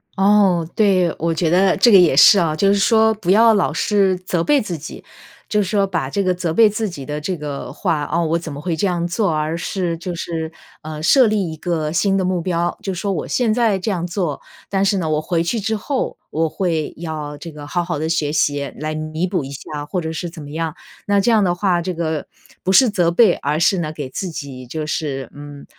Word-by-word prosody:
哦， 195 -3 +3
对。 185 -5 +3
我 165 +1 0
觉 165 0 0
得 185 +2 +3
这 240 - +5
个 200 - +9
也 175 -7 +5
是 195 +7 +8
啊， 160 -3 +1
就 195 +6 +2
是 200 - +4
说 220 +2 +4
不 195 -4 -1
要 225 +3 +6
老 200 -7 +1
是 195 +3 +2
责 180 -2 -2
备 290 +7 +3
自 180 -5 -4
己， 155 +1 -9 0.5
就 210 - +2
是 190 - -2
说 200 -1 +2
把 165 -8 -2
这 200 +8 -1
个 185 -1 +2
责 175 -2 -2
备 220 +4 +6
自 215 +1 -2
己 145 -7 -8
的 150 +1 -4
这 180 +5 -3
个 145 -3 -6
话 165 -7 -1
“哦！ 170 0 0
我 165 +1 0
怎 165 -2 -7
么 140 - -7
会 170 +1 -2
这 200 - +1
样 175 -2 -1
做 200 +3 0
啊？” 160 - 0
而 160 +2 -3
是 175 -1 -2
就 175 +1 -5
是， 165 -1 -4 0.3
呃， 155 0 -7
设 255 - +5
立 205 -6 0
一 160 - -8
个 155 -2 -2
新 195 +4 +1
的 195 - +1
目 180 -1 0
标。 175 0 -1
就 195 - -3
说 200 +3 -2
我 170 -6 -3
现 235 -4 +1
在 225 -4 +2
这 190 +3 -2
样 175 -2 -2
做， 175 -5 -2 0.3
但 195 0 +1
是 195 0 +2
呢， 160 -3 -2
我 155 0 +1
回 165 +1 0
去 225 +7 -1
之 220 +2 -1
后 260 +6 -3
我 160 +1 0
会 160 -2 -2
要 155 -3 -5
这 165 +2 -9
个 150 -1 -10
好 175 +3 -1
好 170 -3 -3
地 160 - -2
学 160 -3 0
习， 145 -2 0
来 155 +1 -3
弥 155 +3 -3
补 180 -4 -1
一 135 - -7
下 145 +1 -7
或 180 +5 -3
者 160 -1 -4
是 175 +2 -4
怎 165 -1 -11
么 145 0 -9
样。 160 0 -3 0.3
那 200 0 +3
这 200 - +1
样 220 -3 +4
的 175 -2 +2
话， 175 -1 +1
这 180 +2 -3
个 160 -3 -3 0.4
不 190 - +1
是 245 +6 +6
责 175 -5 +1
备， 190 +1 +5
而 150 +2 -2
是 180 +2 +3
呢 155 -3 -3
给 145 -4 -6
自 185 +7 -4
己 140 -6 -7
就 155 +5 -5
是， 135 -5 -3
嗯 145 -1 -10
170 Hz, 265 characters per minute, -19 LUFS, 155-195 Hz, 0.5 s, 个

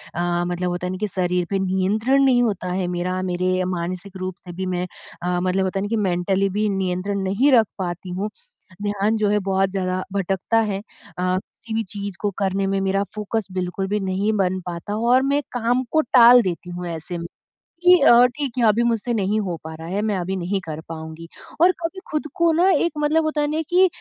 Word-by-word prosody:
अ, 175 0 0
मतलब 180 0 -2
होता 175 0 -3
है - - -3
ना 185 - -4
कि 210 - +1
शरीर 180 -2 0
पे 195 - 0
नियंत्रण 200 +8 +2
नहीं 255 -2 +4
होता 195 -5 -1
है 185 0 -1
मेरा, 180 +1 -2
मेरे 185 0 0
मानसिक 185 +2 -4
रूप 185 -1 -4
से 180 - -7
भी 190 +2 -4
मैं 180 -1 -2 0.4
अ, 180 0 0
मतलब 185 +1 +1
होता 190 +1 -1
है - - -2
ना - - -2
कि 230 - 0
मेंटली 195 0 +1
भी 210 +3 0
नियंत्रण 190 +2 -1
नहीं 205 +10 +2
रख 230 -4 +5
पाती 180 -1 -4
हूँ, 190 +4 -3 0.5
ध्यान 205 +1 0
जो 210 -1 +1
है 210 0 +2
बहुत 195 0 +2
ज़्यादा 185 -1 -2
भटकता 195 +3 0
है। 195 - -2
अ, 185 -3 -4 0.3
किसी 230 -1 -6
भी 225 - 0
चीज़ 200 -1 -6
को 205 - +1
करने 195 0 0
में 195 0 0
मेरा 195 +1 +1
फ़ोकस 215 0 -2
बिल्कुल 185 +1 -2
भी 210 +2 0
नहीं 195 +2 0
बन 185 -1 +1
पाता 175 +4 -4
और 250 +2 +5
मैं 280 +2 +1
काम 245 +1 +1
को 315 - +4
टाल 245 -2 +7
देती 180 -3 -4
हूँ 175 0 -5
ऐसे 170 +1 -5
में 170 0 -5 0.6
कि 360 0 +8
अ, 240 +1 +7
ठीक 265 +1 -4
है 240 - +3
अभी 215 +3 +3
मुझसे 235 0 0
नहीं 210 0 +1
हो 180 -5 -3
पा 160 0 -7
रहा 160 +1 -9
है, 195 +3 -1
मैं 210 -2 0
अभी 185 +2 -2
नहीं 190 +2 -1
कर 155 -1 -5
पाऊँगी। 160 0 -8 0.3
और 355 +2 +6
कभी 340 +3 -4
खुद 305 0 -2
को 340 -1 +3
ना 345 +4 +3
एक 345 -2 +2
मतलब 305 +2 +2
होता 310 -1 0
है 295 - +2
ना 315 +1 0
कि 365 +2 +6
195 Hz, 220 wpm, -22 LUFS, 180-225 Hz, 0.6 s, कि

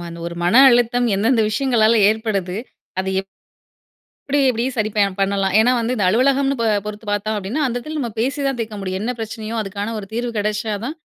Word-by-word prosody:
மா 175 - -7 0.2
ஒரு 170 - -5
மன 175 - +2
அழுத்தம் 245 0 +3
எந்தெந்த 225 +4 +2
விஷயங்களால 230 -2 +2
ஏற்படுது? 205 -5 -2 0.4
அத 190 - -5
எப் 195 - -13 1.0
எப்டி 285 +1 +2
எப்டி 235 -2 0
சரி 215 -3 -1
ப - - +1 0.2
பண்ணலாம்? 195 -1 +1
ஏன்னா 235 +3 +4 0.2
இந்த 215 - -2
அலுவலகம்னு 270 +6 +2
ப - - +1 0.2
பொறுத்து 210 +1 -7
பார்த்தோம் 205 +1 -1
அப்டின்னா, 210 +10 -2
அந்த 245 -2 -3
எடத்துல 305 +5 -6
நம்ம 245 -5 -2
பேசி 265 +6 -1
தான் 270 -2 -1
தீர்க்க 220 -2 -4
முடியும். 190 -1 -3
என்ன 240 +3 -1
பிரச்சனையோ 220 0 -5
அதுக்கான 205 +1 -4
ஒரு 200 - -7
தீர்வு 240 +2 -2
கெடச்சாதான், 215 +4 -2
220 Hz, 185 wpm, -20 LUFS, 205-245 Hz, 1.0 s, ஏன்னா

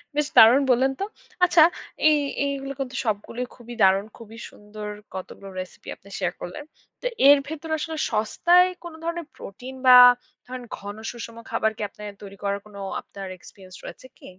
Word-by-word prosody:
বেশ 295 -1 +1
দারুণ 240 +5 +8
বললেন 260 +2 +3
তো! 395 - -1 0.4
আচ্ছা, 345 -3 +6 0.5
এই 305 - +4 0.3
এইগুলো 275 -1 -3
কিন্তু 260 -1 -4
সবগুলোই 230 +3 -3
খুবই 240 -1 -11
দারুণ। 195 +2 +4
খুবই 225 0 -12
সুন্দর 210 0 -10 0.3
কতগুলো 195 +1 -8
রেসিপি। 185 - -11
আপনি 200 - -19
শেয়ার - - -1
করলেন। 180 +12 -7 0.4
তো - - -1 0.2
এর 285 0 +9
ভেতরে 315 +1 -5
আসলে 320 0 -4
সস্তায় 345 +12 +4 0.2
কোনো 340 -2 -9
ধরনের 335 -2 -4
প্রোটিন 250 +7 -10
বা 250 0 +10 0.5
ধরেন 255 0 -7
ঘন 205 +1 -8 0.2
সুষম 230 -1 -9
খাবার 220 - +1
কি - - -7
আপনার 205 0 -10
তৈরি 200 0 -11
করার 200 0 -1
কোনো 205 -1 -12 0.2
আপনার 195 -1 -9
এক্সপেরিয়েন্স 185 0 -15
রয়েছে 260 - -10
কি? - - -17
240 Hz, 165 wpm, -24 LUFS, 205-285 Hz, 0.5 s, বা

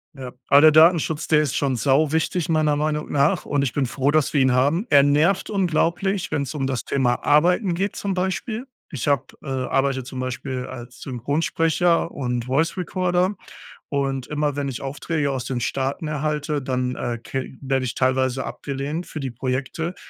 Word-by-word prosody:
Ja, 130 -2 -7 0.2
aber 140 - +7
der 155 0 +8
Datenschutz 160 -1 +4
der 150 -1 +4
ist 145 -3 -2
schon 135 -2 +1
sau 140 +4 +2
wichtig, 160 +1 0
meiner 155 -2 +2
Meinung 150 0 -2
nach. 140 +1 +2
Und 145 - 0
ich 135 -4 -1
bin 140 - +1
froh, 135 +3 -1
dass 155 -1 +1
wir 145 - +3
ihn 130 -1 +3
haben. 145 - +2
Er 140 -2 +6
nervt 155 +9 +2
unglaublich, 190 0 0
wenn's 140 0 -2
um 135 -3 -1
das 130 -3 -2
Thema 125 -3 0
Arbeiten 175 +6 +3
geht 195 +3 -2
zum 200 -1 -2
Beispiel. 190 +6 -2 0.2
Ich 140 -6 -4
habe, 140 -2 +2 0.2
äh - - -10
arbeite 135 0 0
zum 130 0 -7
Beispiel 130 0 -4
als 125 -1 -10
Synchronsprecher 165 +6 0
und 125 -5 -3
Voice 145 +8 0
Recorder 180 +1 0 0.5
und 135 -2 -2
immer 150 -1 -1
wenn 140 -1 -1
ich 130 -3 -5
Aufträge 145 +1 -2
aus 130 -2 -3
den 125 -1 -3
Staaten 135 +5 -2
erhalte, 150 0 -2
dann, 125 -1 -2
äh, 120 -1 -3
ke 130 +3 -5
werde 135 -1 0
ich 120 - -4
teilweise 130 0 +1
abgelehnt 145 +5 -4
für 155 - -6
die 130 -2 -3
Projekte, 135 +8 -3
140 Hz, 180 wpm, -23 LUFS, 130-160 Hz, 0.5 s, der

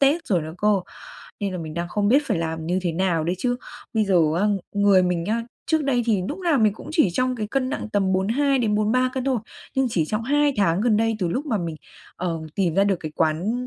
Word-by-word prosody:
Tết 295 +5 +3
rồi 180 -6 +1
nữa 160 +1 -7
cơ, 210 -2 +3 0.6
nên 200 -2 -2
là 180 - -4
mình 160 -1 -6
đang 170 0 -3
không 205 +2 0
biết 275 +5 +5
phải 210 -8 0
làm 160 -1 -3
như 180 +2 +1
thế 175 -2 -1
nào 170 -2 0
đây. 175 - 0
Chứ 245 +2 0 0.4
bây 215 -1 +3
giờ 195 -2 +2 0.2
á, 205 - +2 0.3
người 200 -2 +5
mình 175 -2 0
á, 230 +2 0 0.2
trước 315 -2 +1
đây 250 -3 +1
thì 210 -5 +2
núc 285 - -4
nào 340 -7 +2
mình 215 -2 +4
cũng - - -11
chỉ 315 - +4
trong 255 +4 0
cái 215 -2 -3
cân 255 +3 -1
nặng - - -4
tầm 195 -2 +1
42-43 230 +2 +2
cân 260 - -2
thôi, 265 -2 +1 0.4
nhưng 265 -1 +2
chỉ 165 -7 +1
trong 215 +7 -2
2 290 +3 +2
tháng 190 -3 +2
gần 220 -1 +3
đây 225 0 +1
từ 180 -3 0
lúc 270 - -2
mà 225 -6 0
mình, 165 -3 -4 0.4
ờ, 170 -3 -2
tìm 180 -5 0
ra 195 +2 +4
được 200 -2 +2
cái 155 -1 -6
quán 180 +11 0
210 Hz, 245 wpm, -23 LUFS, 180-250 Hz, 0.6 s, biết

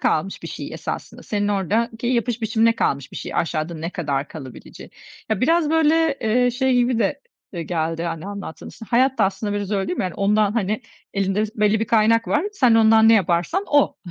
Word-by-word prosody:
kalmış 195 +5 -1
bir - - -6
şey - - -7
esasında. - - -6
Senin 205 -1 -2
oradaki 225 +4 -1
yapış 240 -1 0
biçimine 225 +1 +2
kalmış 140 - -1
bir - - -8
şey - - -6
aşağıda 160 0 -1
ne 160 +2 -5
kadar 145 -5 -2
kalabileceği. 130 -6 -11 0.4
Ya, 220 - 0
biraz, 320 +3 +2
böyle, 320 -2 +2
ııı, 245 +3 +2
şey 260 +1 +1
gibi 245 -1 +2
de, 230 +6 0 0.3
ııı, 170 - -3
geldi, 165 0 -2
hani, 165 0 -4
anlattığın, 200 -6 -7
işte, 225 - -12
hayat 260 +2 +3
da 200 - +4
aslında 200 +2 -2
biraz 205 -1 -3
öyle 195 -2 -1
değil - - -3
mi? - - +1
Yani 180 - -4
ondan, 205 +1 +2
hani, 215 +1 -1 0.3
elinde 195 +1 0
biz 215 +2 -5
belli 210 +1 +3
bir - - +1
kaynak 230 0 +3
var. 300 +4 +1
Sen 250 - +3
ondan 220 0 +6
ne 225 - +7
yaparsan 190 - +1
o 290 -1 +3
215 Hz, 205 wpm, -21 LUFS, 185-240 Hz, 0.4 s, ne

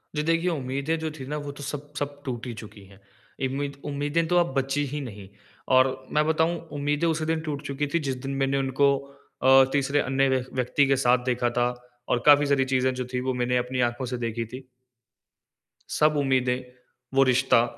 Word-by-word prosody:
जी। 150 - 0
देखिए, 165 +2 +1
उम्मीदें 140 +1 -2
जो 160 0 -2
थी 140 -4 -9
ना, 150 +2 -3
वो 145 -1 -5
तो 140 0 -10
सब 145 +1 -6
सब 145 0 -4
टूट 125 -3 -4
ही 120 - -4
चुकी 105 -1 -13
है। 95 0 -18 0.5
इम्मीद 140 +1 -4
उम्मीदें 145 +3 0
तो 175 +1 +2
अब 170 -5 +2
बची 135 +2 0
ही 145 +2 -4
नहीं। 105 -7 -8 0.5
और 130 +1 +6 0.3
मैं 150 0 +3
बताऊँ, 160 +2 +2 0.2
उम्मीदें 145 +3 0
उसी 160 -1 0
दिन 160 0 0
टूट 145 -2 -3
चुकी 140 +1 -2
थी 170 - +3
जिस 135 - -1
दिन 135 - -3
मैंने 135 +1 +1
उनको 135 +1 +2 0.5
अ, 135 +1 +8
तीसरे 140 0 +1
अन्य 135 0 +2
व्य 130 -1 +1
व्यक्ति 130 +3 +2
के 135 - +3
साथ 125 -1 +3
देखा 125 -1 +1
था 120 - +4 0.4
और 120 - +2
काफ़ी 145 0 +7
सारी 140 -2 +2
चीज़ें 130 -1 +1
जो 125 0 -3
थी, 125 - 0
वो 130 0 -1
मैंने 125 0 0
अपनी 125 +1 -2
आँखों 120 +2 -6
से 125 0 -3
देखी 115 -1 -3
थी। 125 +4 -9 1.3
सब 150 0 +2
उम्मीदें, 130 -2 +1 0.5
वो 135 0 +5
रिश्ता, 130 -2 +4
135 Hz, 205 wpm, -26 LUFS, 125-145 Hz, 1.3 s, अ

